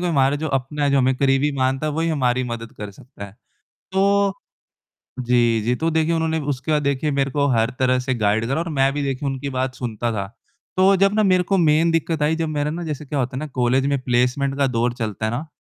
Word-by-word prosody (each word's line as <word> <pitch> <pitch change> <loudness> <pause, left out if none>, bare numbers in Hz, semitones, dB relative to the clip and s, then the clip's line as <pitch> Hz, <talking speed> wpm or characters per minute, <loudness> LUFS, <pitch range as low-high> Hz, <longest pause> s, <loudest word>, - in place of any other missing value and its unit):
कोई 175 -1 0
हमारे 140 -1 +2
जो 155 +1 -3
अपने, 140 +2 -1
जो 140 - +3
हमें 130 0 +2
करीबी 135 +2 +2
मानता 130 +3 0
है 150 - -1
वो 160 - -2
ही 165 - 0
हमारी 130 -5 +1
मदद 115 -1 -6
कर 105 -1 -6
सकता 100 0 -12
है 100 - -11 0.6
तो 200 +1 +2 0.9
जी, 120 -2 +2
जी, 120 +3 +1
तो 165 +1 -1
देखिए 160 +1 +1
उन्होंने 160 0 0
उसके 145 +1 -2
बाद 150 -1 +2
देखिए 140 +1 0
मेरे 140 0 0
को 145 +1 +1
हर 115 -1 +2
तरह 130 -1 +2
से 130 +1 -1
गाइड 110 0 +1
करा 135 +6 -1
और 170 - -3
मैं 135 +1 +3
भी 145 - -2
देखिए 140 0 -2
उनकी 135 +1 -4
बात 130 0 -2
सुनता 120 -1 -3
था 100 -2 -3 0.5
तो 190 +1 +5
जब 195 +1 +3
ना 215 - +3
मेरे 185 -3 +3
को 195 +2 0
मेन 160 0 +3
दिक्कत 165 -1 -1
आई, 155 +2 +2
जब 165 -1 -2
मेरा 150 -1 -1
ना 170 +2 -5
जैसे 150 -1 -5
क्या 145 +1 -3
होता 130 0 -2
है - - -2
ना 155 - -4
कॉलेज 125 +2 +2
में 140 -1 +1
प्लेसमेंट 125 +3 0
का 140 - +3
दौर 120 -1 0
चलता 110 -3 -3
है - - -1
ना 145 +7 -4
140 Hz, 245 wpm, -21 LUFS, 125-155 Hz, 0.9 s, तो